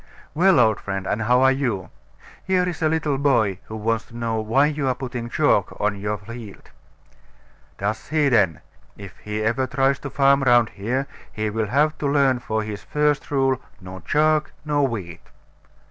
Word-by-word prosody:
Well, 175 Hz, 0 st, +4 dB
old 110 Hz, -3 st, +3 dB
friend, 95 Hz, -1 st, -4 dB
and 105 Hz, +3 st, -1 dB
how 125 Hz, +4 st, +3 dB
are 130 Hz, -, +6 dB
you? 125 Hz, -9 st, -2 dB, 0.5 s
Here 185 Hz, -1 st, +1 dB
is 175 Hz, -1 st, -5 dB
a 155 Hz, -, +3 dB
little 150 Hz, -3 st, 0 dB
boy 115 Hz, -9 st, +2 dB
who 110 Hz, -, -8 dB
wants 110 Hz, 0 st, -1 dB
to 115 Hz, -, -12 dB
know 115 Hz, -1 st, -1 dB
why 115 Hz, +6 st, +3 dB
you 145 Hz, -2 st, -1 dB
are 130 Hz, -, +1 dB
putting 120 Hz, -2 st, -5 dB
chalk -, -, +1 dB
on 105 Hz, 0 st, 0 dB
your 105 Hz, +1 st, -2 dB
field. 110 Hz, 0 st, -11 dB, 1.1 s
Does 105 Hz, +2 st, -3 dB
he 155 Hz, -2 st, +2 dB
then? 100 Hz, -, +2 dB, 0.4 s
If 100 Hz, -2 st, -10 dB
he 105 Hz, +1 st, -4 dB
ever 120 Hz, +4 st, 0 dB
tries 135 Hz, +1 st, +1 dB
to 140 Hz, -, -6 dB
farm 140 Hz, 0 st, +3 dB
round 120 Hz, -3 st, +4 dB
here, 120 Hz, +8 st, -2 dB, 0.3 s
he 110 Hz, 0 st, -3 dB
will 110 Hz, 0 st, -1 dB
have 150 Hz, +6 st, +1 dB
to 145 Hz, -, -1 dB
learn 140 Hz, -3 st, +2 dB
for 110 Hz, -2 st, -2 dB
his 105 Hz, -1 st, -6 dB
first 150 Hz, -1 st, 0 dB
rule 135 Hz, -2 st, +1 dB, 0.2 s
No 95 Hz, -1 st, -9 dB
chalk, 155 Hz, +5 st, +1 dB
no 145 Hz, -1 st, +1 dB
wheat. 100 Hz, -, -3 dB
120 Hz, 180 wpm, -22 LUFS, 110-140 Hz, 1.1 s, are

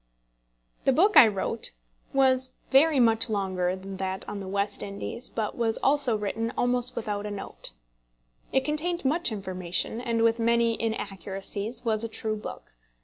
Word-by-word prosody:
The -, -, +5 dB
book 385 Hz, +10 st, +3 dB
I 230 Hz, -, +10 dB
wrote 200 Hz, -3 st, -1 dB, 0.4 s
was 260 Hz, -1 st, +2 dB, 0.2 s
very 285 Hz, +1 st, +5 dB
much 230 Hz, 0 st, +4 dB
longer 185 Hz, -3 st, 0 dB
than 190 Hz, +1 st, -8 dB
that 190 Hz, 0 st, -3 dB
on 205 Hz, -, -5 dB
the 195 Hz, -, -7 dB
West 200 Hz, +1 st, -1 dB
Indies, 205 Hz, +5 st, -5 dB
but 220 Hz, -2 st, -3 dB
was 225 Hz, -2 st, 0 dB
also 275 Hz, -5 st, +3 dB
written 225 Hz, +2 st, -2 dB
almost 245 Hz, 0 st, +1 dB
without 210 Hz, -2 st, -3 dB
a -, -, -4 dB
note. 200 Hz, -, -6 dB, 0.8 s
It 265 Hz, 0 st, +1 dB
contained 330 Hz, +2 st, 0 dB
much 325 Hz, +2 st, +2 dB
information, 185 Hz, +1 st, -2 dB
and, 230 Hz, -2 st, 0 dB
with 230 Hz, 0 st, +3 dB
many 235 Hz, 0 st, +3 dB
inaccuracies, 200 Hz, +1 st, -3 dB
was 220 Hz, -1 st, +1 dB
a 230 Hz, -, -3 dB
true 220 Hz, 0 st, -3 dB
book. 210 Hz, -, -8 dB
225 Hz, 155 wpm, -27 LUFS, 200-250 Hz, 0.8 s, I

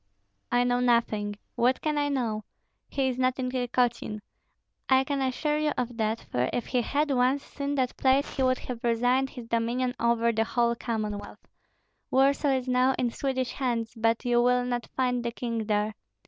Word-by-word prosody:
"I 245 Hz, 0 st, +4 dB
know 245 Hz, 0 st, +1 dB
nothing. 230 Hz, -4 st, +1 dB, 0.2 s
What 250 Hz, +2 st, +2 dB
can 305 Hz, -1 st, -1 dB
I 290 Hz, 0 st, +1 dB
know? 230 Hz, -6 st, -1 dB, 0.5 s
He 270 Hz, -1 st, 0 dB
is 255 Hz, 0 st, -4 dB
not 255 Hz, 0 st, +2 dB
in 255 Hz, -1 st, -2 dB
Tykotsin; 245 Hz, -4 st, 0 dB, 0.7 s
I 265 Hz, 0 st, +5 dB
can 275 Hz, 0 st, -2 dB
assure 295 Hz, +3 st, 0 dB
you 305 Hz, -1 st, +1 dB
of 245 Hz, -1 st, -2 dB
that, 220 Hz, 0 st, 0 dB
for 125 Hz, +1 st, +1 dB
if 245 Hz, -, -2 dB
he 250 Hz, -2 st, 0 dB
had 290 Hz, +5 st, 0 dB
once 260 Hz, +2 st, +2 dB
seen 285 Hz, 0 st, -4 dB
that 255 Hz, -2 st, 0 dB
place 270 Hz, +1 st, +2 dB
he 270 Hz, -, -1 dB
would 255 Hz, 0 st, +3 dB
have 245 Hz, -2 st, -7 dB
resigned 245 Hz, +3 st, +2 dB
his 245 Hz, -4 st, -9 dB
dominion 235 Hz, +2 st, 0 dB
over 235 Hz, 0 st, +2 dB
the 225 Hz, 0 st, +1 dB
whole 235 Hz, +1 st, +1 dB
Commonwealth. 215 Hz, -3 st, -4 dB, 0.6 s
Warsaw 275 Hz, +2 st, +3 dB
is 260 Hz, -1 st, -3 dB
now 255 Hz, +1 st, +3 dB
in 245 Hz, -2 st, 0 dB
Swedish 260 Hz, -1 st, -2 dB
hands, 235 Hz, -4 st, -2 dB
but 225 Hz, +2 st, +1 dB
you 240 Hz, -1 st, +3 dB
will 250 Hz, 0 st, +3 dB
not 245 Hz, -1 st, -2 dB
find 250 Hz, -2 st, +1 dB
the 235 Hz, -, -2 dB
king 230 Hz, -2 st, -3 dB
there. 210 Hz, 0 st, +1 dB
245 Hz, 185 wpm, -27 LUFS, 230-260 Hz, 0.7 s, I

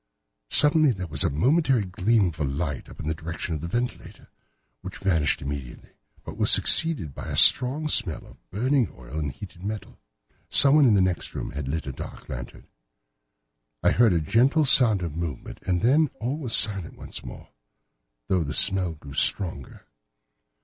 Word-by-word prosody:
Suddenly 150 Hz, -2 st, +5 dB
there 95 Hz, -3 st, -7 dB
was 80 Hz, -, -2 dB
the -, -, +2 dB
momentary 130 Hz, -, 0 dB
gleam 100 Hz, +2 st, 0 dB
of 80 Hz, -, -12 dB
a -, -, -2 dB
light 70 Hz, 0 st, -5 dB
up -, -, -15 dB
in -, -, -8 dB
the 80 Hz, -, -2 dB
direction 85 Hz, +1 st, -7 dB
of 75 Hz, -, -5 dB
the 85 Hz, -, -6 dB
ventilator, 120 Hz, +7 st, -6 dB, 0.5 s
which 95 Hz, 0 st, -9 dB
vanished 80 Hz, -9 st, -1 dB
immediately, 70 Hz, -3 st, -8 dB, 0.3 s
but -, -, -10 dB
was -, -, 0 dB
succeeded 150 Hz, -, +3 dB
by -, -, -9 dB
a -, -, -5 dB
strong 140 Hz, +5 st, +5 dB
smell 85 Hz, -, -1 dB
of -, -, -21 dB
burning 125 Hz, +3 st, -1 dB
oil 65 Hz, +5 st, -8 dB
and 75 Hz, -3 st, -4 dB
heated 90 Hz, +1 st, -13 dB
metal. 105 Hz, +1 st, -7 dB, 0.5 s
Someone 145 Hz, +1 st, +6 dB
in 115 Hz, -5 st, +3 dB
the 95 Hz, -, +2 dB
next 90 Hz, -2 st, -3 dB
room -, -, -6 dB
had 70 Hz, -2 st, -7 dB
lit 80 Hz, +4 st, -4 dB
a 70 Hz, -, -6 dB
dark -, -, -11 dB
lantern. -, -, -9 dB, 1.2 s
I -, -, +3 dB
heard 115 Hz, -4 st, +3 dB
a 85 Hz, -, +1 dB
gentle 130 Hz, -, +1 dB
sound 115 Hz, -8 st, +4 dB
of 80 Hz, -3 st, -6 dB
movement, 80 Hz, -6 st, -7 dB
and 90 Hz, +1 st, -1 dB
then 145 Hz, +5 st, +2 dB
all 130 Hz, +7 st, -4 dB
was 125 Hz, -7 st, +1 dB
silent 100 Hz, -4 st, +2 dB
once -, -, -10 dB
more, -, -, -12 dB, 0.8 s
though 90 Hz, +2 st, 0 dB
the 75 Hz, 0 st, -6 dB
smell 95 Hz, -4 st, +2 dB
grew 70 Hz, -2 st, -13 dB
stronger. 85 Hz, -3 st, 0 dB
95 Hz, 175 wpm, -24 LUFS, 75-120 Hz, 1.2 s, Someone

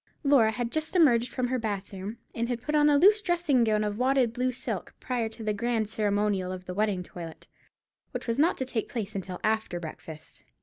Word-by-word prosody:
Laura 275 Hz, -6 st, +5 dB
had 235 Hz, +1 st, -3 dB
just 315 Hz, +3 st, -2 dB
emerged 250 Hz, -9 st, +4 dB
from 250 Hz, -2 st, -1 dB
her 255 Hz, 0 st, 0 dB
bath 205 Hz, -3 st, -4 dB
room, 195 Hz, +4 st, -6 dB, 0.2 s
and 235 Hz, +1 st, -2 dB
had 245 Hz, -1 st, -3 dB
put 300 Hz, -, -3 dB
on 300 Hz, 0 st, +5 dB
a 290 Hz, -, +5 dB
loose 415 Hz, +7 st, +6 dB
dressing 340 Hz, -, +2 dB
gown 215 Hz, -1 st, +2 dB
of 210 Hz, +1 st, -2 dB
wadded 255 Hz, -2 st, +2 dB
blue 255 Hz, +1 st, 0 dB
silk, 250 Hz, -, -5 dB
prior 240 Hz, -3 st, -2 dB
to 225 Hz, +1 st, -10 dB
the 215 Hz, -1 st, 0 dB
grand 225 Hz, 0 st, 0 dB
ceremonial 205 Hz, -3 st, 0 dB
of 185 Hz, 0 st, -7 dB
the 180 Hz, -, -5 dB
wedding 200 Hz, -2 st, 0 dB
toilet, 170 Hz, -2 st, -9 dB, 0.6 s
which -, -, -5 dB
was 230 Hz, +1 st, -1 dB
not 325 Hz, +4 st, +3 dB
to 260 Hz, -, -1 dB
take 245 Hz, -3 st, -2 dB
place 220 Hz, -4 st, -4 dB
until 185 Hz, -2 st, -5 dB
after 220 Hz, -5 st, 0 dB
breakfast. 160 Hz, -1 st, -9 dB
230 Hz, 215 wpm, -28 LUFS, 205-255 Hz, 0.6 s, loose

